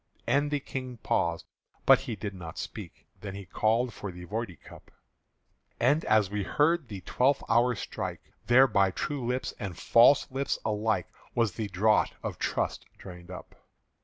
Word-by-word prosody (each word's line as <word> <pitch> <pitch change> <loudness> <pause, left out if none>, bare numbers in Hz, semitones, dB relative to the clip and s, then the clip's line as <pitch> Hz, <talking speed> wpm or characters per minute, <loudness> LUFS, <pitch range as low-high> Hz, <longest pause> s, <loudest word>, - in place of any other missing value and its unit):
'" - - -36
And 145 +1 +2
the 145 0 0
King 130 -2 -6
paused, 85 -6 -1 0.4
but - - +7
he 115 - -5
did 100 0 -5
not 85 -4 -9
speak. - - -8
Then 100 -2 -7
he 100 -1 -8
called 115 +5 +1
for 100 -1 -6
the 90 0 -10
Voidee 105 -2 -4
cup: - - -15 0.9
And 145 +7 +3
as 105 -3 +3
we 105 0 -1
heard 150 - +1
the 100 -4 -7
twelfth 135 +7 +1
hour 120 +2 +3
strike, - - -6
There 130 +2 +7
by 100 -6 +3
true 140 +7 -3
lips 125 +2 -2
and 95 -7 -5
false 125 +4 +5
lips 135 +1 -1
alike 105 -4 0 0.3
Was 115 -3 +2
the 110 +1 -4
draught 105 +3 +2
of - - -5
trust - - -2
drained 90 -1 -11
up. 90 - -9
110 Hz, 170 wpm, -29 LUFS, 95-125 Hz, 0.9 s, but